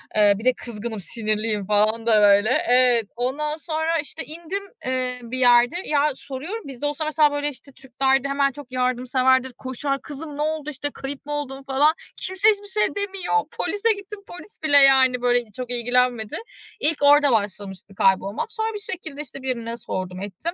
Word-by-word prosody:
Eee, 210 Hz, -1 st, +5 dB
bir 220 Hz, -, -9 dB
de 255 Hz, -, +5 dB
kızgınım, 225 Hz, -2 st, -7 dB
sinirliyim 215 Hz, 0 st, -2 dB
falan 215 Hz, +2 st, +2 dB
da 220 Hz, -2 st, +4 dB
böyle. 205 Hz, +2 st, +5 dB, 0.2 s
Evet. 245 Hz, -3 st, +4 dB
Ondan 295 Hz, +5 st, -2 dB
sonra, 320 Hz, 0 st, -1 dB
işte, 295 Hz, -, -6 dB
indim, 340 Hz, +6 st, -5 dB, 0.2 s
eee, 255 Hz, -1 st, -1 dB
bir 245 Hz, +2 st, -5 dB
yerde. 245 Hz, +3 st, +5 dB
Ya, 300 Hz, 0 st, +2 dB
soruyorum, 310 Hz, +14 st, -7 dB
biz 265 Hz, -2 st, -10 dB
de -, -, -2 dB
olsa 295 Hz, +2 st, -2 dB
mesela, 305 Hz, -1 st, +3 dB
böyle, 290 Hz, 0 st, -1 dB
işte, 275 Hz, 0 st, -14 dB
Türkler'de 265 Hz, +1 st, 0 dB
hemen 275 Hz, 0 st, +1 dB
çok 275 Hz, -2 st, -12 dB
yardımseverdir, 255 Hz, +1 st, +1 dB
koşar. 275 Hz, +2 st, -3 dB
"Kızım 295 Hz, 0 st, -8 dB
ne -, -, -3 dB
oldu? 305 Hz, -1 st, -2 dB
İşte, 290 Hz, 0 st, -4 dB
kayıp 275 Hz, +1 st, -7 dB
mı 295 Hz, -, -7 dB
oldun?" 275 Hz, -2 st, -4 dB
falan. 275 Hz, +4 st, +3 dB, 0.2 s
Kimse 375 Hz, +3 st, -1 dB
hiçbir 410 Hz, -1 st, 0 dB
şey 420 Hz, +1 st, 0 dB
demiyor. 395 Hz, 0 st, -2 dB, 0.2 s
Polise 435 Hz, +2 st, 0 dB
gittim. 405 Hz, +1 st, -9 dB
Polis 355 Hz, +1 st, -13 dB
bile, 290 Hz, -2 st, +6 dB
yani, 265 Hz, -2 st, +6 dB
böyle, 245 Hz, -3 st, +1 dB
çok 245 Hz, +3 st, -6 dB
ilgilenmedi. 245 Hz, -2 st, +1 dB, 0.4 s
İlk 310 Hz, +1 st, +1 dB
orada 285 Hz, -1 st, +6 dB
başlamıştı 200 Hz, -2 st, -3 dB
kaybolmak. 195 Hz, -, +1 dB
Sonra 445 Hz, -1 st, -2 dB
bir 415 Hz, -, -5 dB
şekilde, 340 Hz, -9 st, -5 dB
işte, 275 Hz, -1 st, -10 dB
birine 235 Hz, -3 st, -3 dB
sordum, 185 Hz, -4 st, -5 dB
ettim. 205 Hz, -, -4 dB
265 Hz, 175 wpm, -23 LUFS, 235-300 Hz, 0.4 s, bile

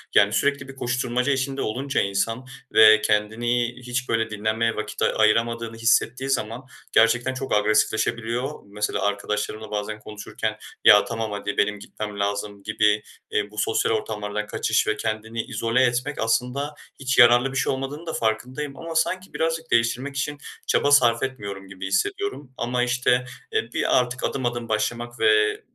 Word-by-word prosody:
Yani, -, -, +5 dB
sürekli 140 Hz, -2 st, +1 dB
bir 135 Hz, -, -10 dB
koşturmaca 125 Hz, +1 st, 0 dB
içinde 135 Hz, 0 st, -2 dB
olunca 135 Hz, +6 st, -1 dB
insan 115 Hz, +6 st, -1 dB, 0.3 s
ve 110 Hz, 0 st, +8 dB
kendini 120 Hz, +4 st, 0 dB
hiç, 125 Hz, +1 st, -4 dB
böyle, 115 Hz, 0 st, +1 dB
dinlenmeye 110 Hz, +2 st, 0 dB
vakit -, -, -5 dB
a -, -, +4 dB
ayıramadığını 115 Hz, +1 st, +1 dB
hissettiği 120 Hz, +3 st, +1 dB
zaman 120 Hz, -1 st, -1 dB, 0.3 s
gerçekten 120 Hz, +3 st, +3 dB
çok 130 Hz, +1 st, -4 dB
agresifleşebiliyor. 110 Hz, +5 st, 0 dB
Mesela 105 Hz, +1 st, -2 dB
arkadaşlarımla 105 Hz, +1 st, -2 dB
bazen 105 Hz, +1 st, -3 dB
konuşurken, 105 Hz, -1 st, -5 dB, 0.3 s
"Ya, 105 Hz, -1 st, +8 dB
tamam, 115 Hz, -2 st, -3 dB
hadi, 105 Hz, 0 st, -4 dB
benim 105 Hz, 0 st, +1 dB
gitmem 105 Hz, 0 st, -7 dB
lazım." 100 Hz, 0 st, -3 dB
gibi, 105 Hz, 0 st, +2 dB, 0.3 s
eee, 105 Hz, 0 st, -1 dB
bu 105 Hz, -, -15 dB
sosyal 110 Hz, +1 st, +1 dB
ortamlardan 105 Hz, -1 st, -3 dB
kaçış -, -, 0 dB
ve 110 Hz, 0 st, 0 dB
kendini 110 Hz, +1 st, -3 dB
izole 120 Hz, +1 st, 0 dB
etmek 125 Hz, +4 st, 0 dB
aslında 125 Hz, +6 st, 0 dB, 0.3 s
hiç 135 Hz, -1 st, -1 dB
yararlı 120 Hz, +1 st, +6 dB
bir 135 Hz, -, -3 dB
şey 135 Hz, -, +1 dB
olmadığının 135 Hz, +5 st, -5 dB
da 160 Hz, -, -4 dB
farkındayım 130 Hz, +6 st, -2 dB
ama 165 Hz, 0 st, -6 dB
sanki 185 Hz, +3 st, 0 dB
birazcık 165 Hz, 0 st, -2 dB
değiştirmek 120 Hz, +4 st, +1 dB
için 145 Hz, +2 st, -2 dB, 0.3 s
çaba 145 Hz, -, +2 dB
sarf 120 Hz, -4 st, +5 dB
etmiyorum 100 Hz, -7 st, -5 dB
gibi 95 Hz, 0 st, -7 dB
hissediyorum. 400 Hz, -, -2 dB
Ama, 125 Hz, +1 st, 0 dB
işte, 125 Hz, 0 st, +1 dB, 0.3 s
eee, 435 Hz, -1 st, -1 dB
bir -, -, +2 dB
artık 125 Hz, 0 st, -3 dB
adım 130 Hz, -2 st, -1 dB
adım 120 Hz, -1 st, -2 dB
başlamak 120 Hz, +2 st, -2 dB
ve 110 Hz, -1 st, +3 dB
115 Hz, 155 wpm, -24 LUFS, 110-130 Hz, 0.3 s, ve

